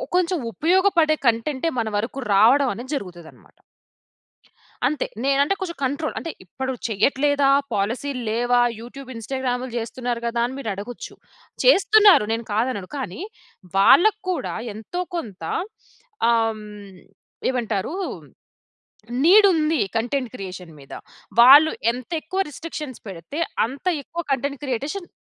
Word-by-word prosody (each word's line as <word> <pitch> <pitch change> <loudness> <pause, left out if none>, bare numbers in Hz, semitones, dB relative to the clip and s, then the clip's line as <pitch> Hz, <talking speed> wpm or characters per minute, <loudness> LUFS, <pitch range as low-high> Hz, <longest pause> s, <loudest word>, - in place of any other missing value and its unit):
కొంచెం 360 0 +2
ఉపయోగపడే 335 - +3
కంటెంటే 260 +6 0
మన 225 - -1
వరకు 225 +6 -3
రావడం 245 +8 +5
అనేది 250 +7 -7
జరుగుతదనమాట. 175 - -10 1.3
అంతే. 295 +3 -1 0.2
నేనంటే 275 +6 +2
కొంచెం 345 -3 -4
కంట్రోల్. 285 +4 -2
అంటే 330 - -5
ఇప్పుడు 265 +8 -4
చేయట్లేదా, 275 +6 +2 0.2
పాలిసీలు 245 +6 -2
లేవా, 245 +2 +2 0.2
యూట్యూబ్, 260 +3 -10
ఇన్‌స్టాగ్రామ్లు 250 +2 -3
చేస్తున్నారు 240 +1 -3
కదా 235 0 -1
అని 255 +2 -5
మీరు 230 - -4
అడగొచ్చు. 205 +5 -8 0.5
చేస్తున్నారు 420 - +6
నేను 230 0 -4
కాదనను. 215 -4 -1
కానీ, 260 - -5 0.6
వాళ్ళక్కూడా 370 - +4 0.2
ఎంతో 225 - -5 0.2
కొంత 205 - -7 0.9
ఆహ్, 230 -1 +3
హ్మ్, 210 -3 -11 0.5
ఏమంటారు? 230 - -2 1.3
నీడుంది. 330 - +5 0.2
కంటెంట్ 245 +2 -1
క్రియేషన్ 185 -5 -8
మీద. 135 -1 -15 0.5
వాళ్ళు 285 +6 +9 0.2
ఎంతెక్కువ 315 +9 -4
రిస్ట్రిక్షన్స్ 300 -4 -7
పెడితే, 185 - -8 0.3
అంత 265 +4 -10 0.2
ఎక్కువ 340 +5 -5
కంటెంట్ 280 +1 -2
క్రియేటేషన్ 285 - -3
260 Hz, 110 wpm, -22 LUFS, 225-310 Hz, 1.3 s, వాళ్ళు